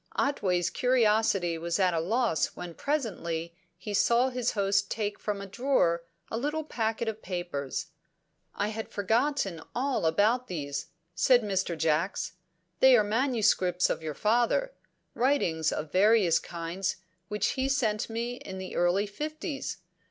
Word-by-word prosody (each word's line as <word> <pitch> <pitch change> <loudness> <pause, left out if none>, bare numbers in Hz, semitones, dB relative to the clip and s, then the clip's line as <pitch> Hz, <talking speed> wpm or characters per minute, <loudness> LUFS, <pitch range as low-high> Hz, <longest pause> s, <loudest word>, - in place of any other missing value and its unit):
Otway's 185 -11 +1
curiosity 215 -8 +2
was 170 +1 -1
at 185 -3 +3
a 165 - +1
loss 220 +1 0
when 175 -1 -7
presently 170 - -2 0.2
he 205 +3 -6
saw 235 +5 +3
his 250 -2 -1
host 200 -1 +1
take 210 -2 -2
from 210 -2 -3
a 200 - -6
drawer 195 -6 +1 0.3
a 225 - -1
little 300 +4 -1
packet 225 -5 -2
of 220 0 -3
papers. 175 -7 -4 0.6
"I 205 - 0
had 220 +1 -5
forgotten 215 - 0
all 255 -8 0
about 220 +9 +2
these," 145 -5 -4 0.3
said 245 +8 +4
Mr. 190 -4 -1
Jacks. 160 +4 0 0.5
"They 260 -1 +7
are 215 - +4
manuscripts 215 -6 +2
of - - -2
your 155 -2 -4
father; 240 - +1 0.4
writings 175 - +1
of 155 -1 -4
various 195 -3 +4
kinds 170 +3 -3 0.3
which 210 0 0
he 265 0 -1
sent 225 -7 0
me 235 +2 -3
in 190 -5 -8
the 190 0 -6
early 175 +4 +2
fifties. 300 - -5
205 Hz, 145 wpm, -29 LUFS, 175-245 Hz, 0.6 s, They